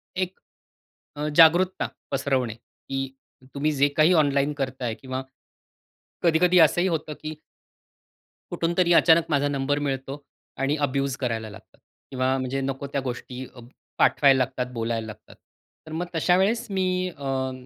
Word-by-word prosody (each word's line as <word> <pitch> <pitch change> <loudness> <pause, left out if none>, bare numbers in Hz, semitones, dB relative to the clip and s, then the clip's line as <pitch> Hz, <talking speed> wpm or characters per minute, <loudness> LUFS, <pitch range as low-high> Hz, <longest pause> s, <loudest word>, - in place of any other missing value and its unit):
एक 185 0 -3 0.8
अ, 150 - -2
जागरूकता 175 +3 +5 0.2
पसरवणे 135 -4 0
की 135 +3 -6 0.5
तुम्ही 150 +2 0
जे 140 0 +3
काही 155 +4 +5
ऑनलाईन 145 -2 +2
करताय 130 -4 -3
किंवा 130 +1 -5 1.0
कधी-कधी 175 +2 +4
असं 160 +2 +5
ही 190 - +2
होतं 155 -3 -2
की 155 0 -5 1.2
कुठून 165 +1 -1
तरी 175 -2 +4
अचानक 165 0 +6
माझा 145 -1 +2
नंबर 145 +1 -1
मिळतो 135 0 -4 0.4
आणि 140 +2 +1
अब्यूज 135 -1 -1
करायला 115 -4 -3
लागतात 100 - -15 0.3
किंवा 130 0 0
म्हणजे 130 +1 -2
नको 135 +1 -3
त्या 140 0 -2
गोष्टी 125 0 -6 0.5
पाठवायला 135 -2 +5
लागतात, 130 0 -1
बोलायला 115 -1 -2
लागतात. 110 0 -12 0.5
तर - - -9
मग 170 +3 -2
तशा 175 +2 +3
वेळेस 225 +5 +1
मी 185 -1 0
अ, 135 -1 -2
140 Hz, 140 wpm, -25 LUFS, 130-165 Hz, 1.2 s, अचानक